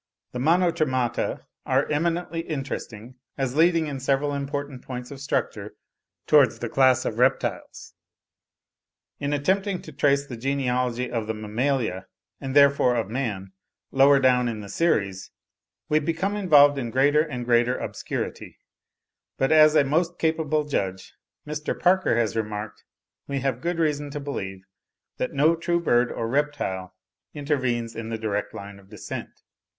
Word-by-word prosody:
The 125 - -5
Monotremata 155 -5 +1 0.2
are 135 +2 +1
eminently 165 +2 -1
interesting, 130 -6 -6 0.2
as 135 -2 -2
leading 165 +1 +4
in 140 -3 -5
several 135 +2 0
important 140 -1 -4
points 125 0 -7
of 140 - -8
structure 140 - -3 0.5
towards - - +5
the - - -4
class 130 -2 +3
of - - -3
reptiles. - - -1 1.3
In 140 0 -2
attempting 190 +6 0
to 155 - -10
trace 140 0 +2
the 125 -4 -8
genealogy 125 -1 -1
of 115 -3 -2
the 110 - -2
Mammalia, 110 -3 -2 0.3
and 135 -1 -5
therefore 140 -3 +5
of 110 -3 -2
man, 105 -7 -3 0.4
lower 140 +1 +5
down 125 -2 +3
in 110 -2 -4
the 100 - -9
series, 100 - 0 0.6
we 155 - +3
become 170 +6 -1
involved 145 -8 +5
in 120 -3 -3
greater 145 +5 +3
and 125 -6 -4
greater 120 +1 +2
obscurity; - - -5 0.8
but 135 - +1
as 155 0 +6
a 150 - +6
most 165 +5 0
capable 160 -2 0
judge, 95 -10 -3 0.3
Mr. 150 0 -4
Parker, 185 -8 +3
has 115 -3 0
remarked, 105 -1 -4 0.4
we 140 -1 -2
have 130 -2 -1
good 175 +2 -2
reason 150 -3 0
to 145 +1 -5
believe, 95 -10 -5 0.5
that 125 - -3
no 155 +4 +4
true 170 +1 0
bird 120 -7 +2
or 115 - -3
reptile 115 -9 -2 0.4
intervenes 130 -6 -1
in 115 -1 -6
the 115 - -3
direct 105 -2 -2
line 100 0 -9
of 95 -1 -20
descent. 105 -2 -8
135 Hz, 145 wpm, -25 LUFS, 120-150 Hz, 1.3 s, as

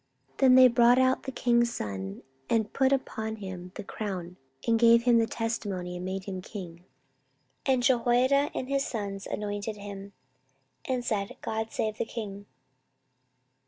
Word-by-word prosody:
14:023:011 - - -34
Then 260 -2 +6
they 255 0 +9
brought 240 0 +5
out 260 0 +3
the 265 - -5
king's 235 -2 +2
son, 95 -1 -5 0.3
and 220 -2 +1
put 265 0 +3
upon 220 -5 -1
him 185 -3 -8
the 210 - -6
crown, 185 -4 -5 0.3
and 230 -1 +3
gave 235 0 +6
him 240 -1 +5
the 225 - +2
testimony, 205 -7 -3
and 180 - -6
made 190 0 -3
him 185 -1 -5
king. 180 -3 -9 0.8
And 260 -2 +3
Jehoiada 255 +3 +3
and 255 - -3
his 275 0 +1
sons 200 -5 -4
anointed 205 +1 -4
him, 200 -1 -8 0.7
and 255 -2 -2
said, 200 -4 -2
God 220 0 -3
save 215 -1 -2
the - - 0
king. 205 -3 -7
220 Hz, 160 wpm, -28 LUFS, 195-245 Hz, 0.8 s, they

